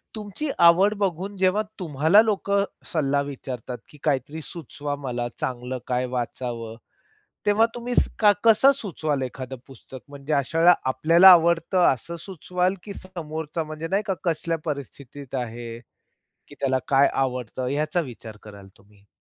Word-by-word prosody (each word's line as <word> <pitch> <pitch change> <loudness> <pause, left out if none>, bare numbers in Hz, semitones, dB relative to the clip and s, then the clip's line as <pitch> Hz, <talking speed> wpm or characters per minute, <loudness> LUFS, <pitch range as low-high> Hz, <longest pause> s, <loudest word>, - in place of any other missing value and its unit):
तुमची 215 +8 -5 0.2
आवड 185 +5 +6
बघून, 195 0 -2
जेव्हा 190 +2 +2 0.2
तुम्हाला 160 +3 +4
लोकं 200 -2 +1 0.2
सल्ला 140 -3 0
विचारतात, 130 -3 -6
की 150 - -16
काहीतरी 145 +2 -1
सुचवा 145 -2 -6
मला 120 -1 -2
चांगलं 125 0 -3
काय 125 0 0
वाचावं. 120 -2 -4 0.7
तेव्हा 210 +2 +4
तुम्ही 240 +1 -4 0.3
कसं 205 +2 +6
सां 275 - +8
सुचवाल 155 -8 -2
एखादं 130 +1 -6
पुस्तक, 135 0 -12
म्हणजे 140 +1 -5
अशा 140 +2 0
वेळेला 175 +2 +7 0.2
आपल्याला 165 +8 +6
आवडतं 170 +1 +4
असं 150 +7 -8
सुचवाल? 180 0 -1
की 205 - -7
समोरचा 160 -4 -5
म्हणजे 155 +1 -6
नाही 200 +2 +1
का 195 - 0
कसल्या 165 -1 -1
परिस्थितीत 140 -2 -7
आहे, 115 0 -8 0.7
की - - -13
त्याला 130 -1 +1
काय 140 0 +5
आवडत 130 -2 -2
याचा 155 +5 0
विचार 115 -7 -8
कराल 100 -2 -12
तुम्ही? 100 0 -24
150 Hz, 140 wpm, -24 LUFS, 130-185 Hz, 0.7 s, सां